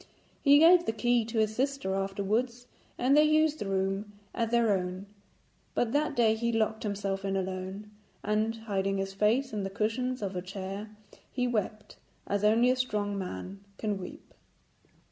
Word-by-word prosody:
He 285 0 +6
gave 340 +3 +6
the 225 - +1
key 240 +1 +2
to 230 +1 -5
his 220 0 +1
sister 270 -6 -1
afterwards, 205 +6 -1 0.3
and 255 +3 +3
they 300 - +7
used 310 0 +3
the 205 - -4
room 195 +2 -1 0.2
as 230 -2 -1
their 230 -2 +3
own; 185 +1 -4 0.7
but 235 - +1
that 295 +1 0
day 225 -2 +4
he 235 +1 -1
locked 220 -1 0
himself 200 -2 -3
in 195 0 -1
alone, 190 +2 -5 0.3
and, 215 +2 0
hiding 195 -3 -2
his 195 0 -3
face 225 +7 +1
in 210 - -2
the 195 - -3
cushions 225 +4 -2
of 195 -1 -3
her 180 - -3
chair, 195 +2 -6 0.4
he 250 -1 0
wept 215 -2 -3 0.3
as 200 0 -1
only 230 +4 +4
a - - +2
strong 210 -5 -1
man 190 - -6 0.2
can 210 -3 -2
weep. 180 - -10
215 Hz, 170 wpm, -29 LUFS, 195-240 Hz, 0.7 s, they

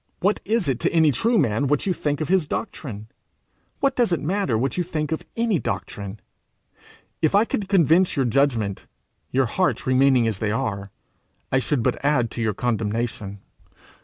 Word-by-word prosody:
What 200 +3 +1
is 215 -4 0
it 130 -3 0
to - - 0
any 160 -3 +4
true 225 - +1
man 135 - +1
what 145 +1 +1
you 190 - +1
think 145 -3 -2
of 155 - -1
his 185 -4 +2
doctrine? 115 - -5 0.8
What 275 -1 +2
does 240 -6 +2
it 170 - +1
matter 175 - 0
what 130 +3 -1
you 180 - 0
think 155 -3 -3
of 160 - -2
any 230 -6 +1
doctrine? 100 -1 -5 1.0
If 160 +3 +2
I 210 +3 +5
could 200 -4 -3
convince 180 -1 +4
your 135 -3 +1
judgment, 120 -6 0 0.4
your 135 +1 +2
hearts 180 +10 0
remaining 130 -2 +4
as 105 -4 -2
they 110 - -1
are, 100 -2 -2 0.6
I 130 - +3
should 130 -1 -1
but - - -1
add 140 -6 +2
to 120 - -4
your 110 -3 0
condemnation. 110 -3 -2
140 Hz, 180 wpm, -23 LUFS, 115-175 Hz, 1.0 s, I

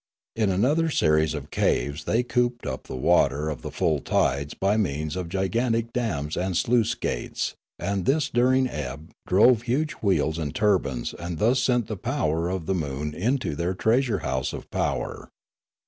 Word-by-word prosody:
In 110 -3 +1
another 140 - +2
series 80 - +2
of 75 -1 -7
caves 70 +5 0
they 115 +3 +2
cooped 125 0 0
up - - -4
the - - -6
water 70 +4 +2
of 75 - -6
the - - -5
full 75 -2 0
tides 70 +2 0
by 100 +2 +1
means 75 -6 -1
of 90 -2 -4
gigantic 115 +5 0
dams 80 -12 -2
and 90 -1 -1
sluice 120 -2 +2
gates, - - -3 0.2
and 100 -2 -2
this 145 +1 +3
dur 125 -1 +3
ing 130 0 +3
ebb 75 - -6 0.2
drove 110 +5 +5
huge 135 +6 0
wheels 80 -6 +1
and 75 -2 -4
turbines 90 - +1
and 85 -1 -5
thus 120 +7 +3
sent 125 -3 +2
the 110 - -5
power 85 - -1
of 90 -3 -3
the 95 - 0
moon 75 -3 -3
into 120 - -1
their 85 +4 -1
treasure 115 -1 +1
house 65 -1 -1
of - - -7
power. - - -2
95 Hz, 175 wpm, -25 LUFS, 75-120 Hz, 0.2 s, drove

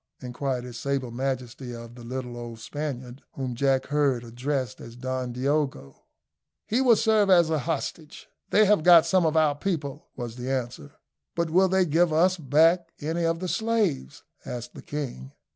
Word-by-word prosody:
inquired 125 0 -3
his 125 -1 -8
sable 140 -3 -2
majesty 125 -1 -4
of 115 0 -10
the 120 -1 -12
little 125 0 -5
old 120 -1 -7
Spaniard, 130 -1 -6
whom 130 -2 -4
Jack 135 +2 +1
heard 140 -4 +1
addressed 125 +1 -3
as 115 0 -10
Don 130 0 -3
Diogo. 135 - -2 0.6
"He 235 +5 +1
will 245 -3 +6
serve 215 -2 +3
as 170 -3 +5
a 155 - +1
hostage 155 +1 -4 0.2
they 215 +1 +5
have 210 -4 +4
got 170 0 +7
some 185 -3 +3
of 160 0 +1
our 155 -2 +4
people," 145 -3 -4
was 120 -1 -6
the 125 +1 -5
answer. 120 - -4 0.4
"But 170 -1 -1
will 185 +3 +5
they 190 0 +3
give 165 +1 +2
us 180 +4 +3
back 165 +3 +3
any 165 +3 -1
of 165 0 +1
the 185 - -2
slaves?" 215 - -1 0.2
asked 120 0 -6
the - - -10
king. 125 - -6
140 Hz, 175 wpm, -26 LUFS, 125-165 Hz, 0.6 s, got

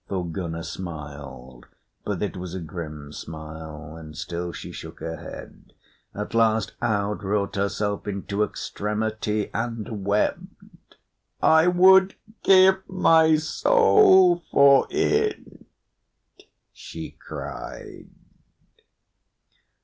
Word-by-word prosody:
Thorgunna 85 -2 -4
smiled, 70 -8 -9 0.4
but 105 -1 -3
it 105 - -3
was 90 -1 -6
a - - -4
grim 75 -3 -8
smile, 80 -1 -9
and 80 -2 -11
still 85 0 -4
she - - -8
shook - - -10
her 80 0 -5
head. - - -11 0.4
At 105 +2 -5
last 110 -2 +2
Aud 105 -3 -1
wrought 100 0 -1
herself 100 +1 -2
into 100 +1 -2
extremity 105 0 -3
and 115 -2 -4
wept. 100 +2 -3 0.4
"I 160 +2 +5
would 190 +2 +6 0.3
give 190 0 +6
my 160 -4 +4
soul 185 - +4
for 140 -1 +6
it," 425 +3 -1 1.1
she - - -9
cried. - - -9
105 Hz, 95 wpm, -24 LUFS, -, 1.1 s, would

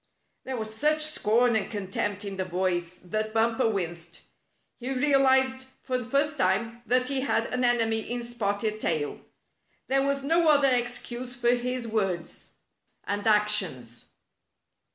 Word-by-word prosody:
There 260 -1 -4
was 220 -1 -5
such 305 +6 +2
scorn 245 -5 +2
and 210 -3 0
contempt 205 0 -3
in 195 -1 -5
the 190 - 0
voice 180 -1 -1
that 215 +4 -3
Bumper 230 +1 +2
winced. 170 -4 -4 0.6
He 255 +2 -4
realized 265 -1 +3 0.2
for 255 -1 -1
the 245 -1 -8
first 290 +2 +1
time 225 +5 0
that 250 +2 +2
he 270 -1 -1
had 275 - +1
an 250 0 0
enemy 230 -2 +2
in 240 +2 -4
Spotted 215 -2 -2
Tail. 155 -7 -2 0.6
There 270 +1 +2
was 275 0 0
no 330 +3 +3
other 285 -3 +5
excuse 245 0 -2
for 240 0 +2
his 245 0 -2
words 195 -6 -3 0.5
and 205 +1 -2
ac 210 -1 +4
tions. 130 - -3
235 Hz, 150 wpm, -27 LUFS, 205-260 Hz, 0.6 s, other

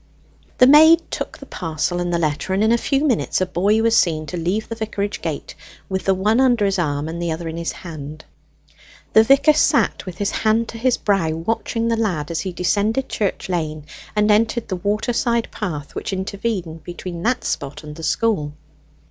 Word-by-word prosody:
The 250 - +7
maid 315 +4 +7
took - - -4
the - - -11
parcel 165 +1 -3
and 175 0 -1
the 170 - +1
letter, 155 +3 -1
and 200 - +2
in 220 - +3
a 235 - +4
few 275 +4 0
minutes 250 -7 +1
a 185 - +1
boy 205 +5 +1
was 230 0 +3
seen 155 -7 +2
to 155 - -6
leave 180 +6 -1
the - - -5
vicarage 210 -2 -3
gate, - - -4 0.4
with 190 -1 -3
the 195 - +3
one 210 +5 +2
under 245 -5 +3
his 195 -1 0
arm, 145 -2 -1
and 170 +1 -5
the 170 -1 -1
other 165 +1 -4
in 160 - -5
his 170 0 -3
hand. 155 -3 -9 0.9
The 220 - +8
vicar 275 +5 +5
sat 300 - +2
with 180 -1 -7
his 200 +1 -1
hand 225 +1 +1
to 230 - -7
his 250 +1 +2
brow, 195 -6 +1
watching 225 +6 -2
the 230 -1 +1
lad 175 -9 -1
as 165 - -2
he 190 - -3
descended 205 +9 0
Church 205 -3 -2
Lane 155 -4 -3 0.3
and 210 0 +3
entered 225 +2 +1
the 190 - -1
waterside 230 +4 0
path 155 -9 -5
which - - -4
intervened 190 -4 -3
between 175 -1 -7
that 245 +5 0
spot 140 +2 -4
and 150 0 -9
the 165 - -9
school. 160 -5 0
195 Hz, 200 wpm, -21 LUFS, 165-225 Hz, 0.9 s, The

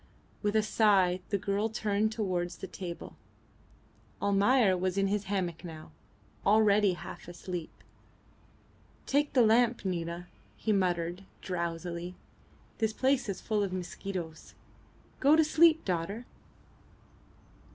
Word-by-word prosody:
With 210 0 0
a 215 - +4
sigh 195 -5 +3
the 200 - +1
girl 200 +3 -1
turned 215 -1 0
towards 180 -5 -2
the - - -7
table. 180 -2 -8 1.0
Almayer 200 +1 +3
was 185 +1 -1
in 195 - +3
his 205 0 -1
hammock 185 -4 -2
now, 160 - -9 0.5
already 205 -1 +4
half 175 - -9
asleep. 175 -1 -6 1.4
"Take 290 +2 +1
the 250 - +5
lamp, 235 0 +3
Nina," 170 -1 -3 0.3
he 220 - 0
muttered, 175 -1 0 0.2
drowsily. 170 0 -4 0.6
"This 220 -1 +1
place 260 -1 +1
is 190 - -4
full 215 -2 0
of 200 -2 -1
mosquitoes. 180 -2 -6 0.6
Go 285 +3 +6
to 320 - +5
sleep, 320 +1 +4
daughter." 190 +6 -2
195 Hz, 120 wpm, -30 LUFS, 180-220 Hz, 1.4 s, Go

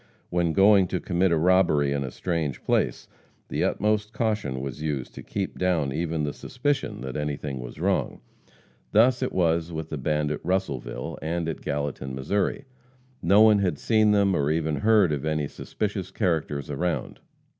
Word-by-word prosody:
When 85 -2 +1
going 100 +1 +5
to 90 - -2
commit 90 0 +1
a 85 - +3
robbery 85 -4 +3
in 70 -1 -1
a 65 - -4
strange 80 -3 -3
place, - - 0 0.4
the - - -1
utmost 105 +1 0
caution 105 - -1
was 70 +2 -6
used 75 -5 -3
to - - -9
keep 100 -2 -4
down 85 -7 +1
even 80 0 -1
the 75 -1 -2
suspicion 135 - -2
that 65 0 -5
anything 75 -2 -3
was 60 -1 -8
wrong. - - 0 0.7
Thus 120 +4 +5
it 130 - -1
was 85 -1 +1
with 80 -1 -5
the 75 - -3
band 75 +1 0
at 75 - -4
Russellville, 70 -10 -2
and 80 +2 -2
at 80 - -4
Gallatin, 70 -2 -3
Mo. 90 +9 0 0.7
No 100 +5 +5
one 110 -2 +6
had 90 -7 0
seen 110 +5 +3
them 100 -2 +3
or 70 -2 +1
even 80 -1 0
heard 105 -6 +4
of 75 -2 -2
any 75 -2 -1
suspicious - - -4
characters 75 -5 -1
around. 85 +4 -2
80 Hz, 170 wpm, -26 LUFS, 75-95 Hz, 0.7 s, one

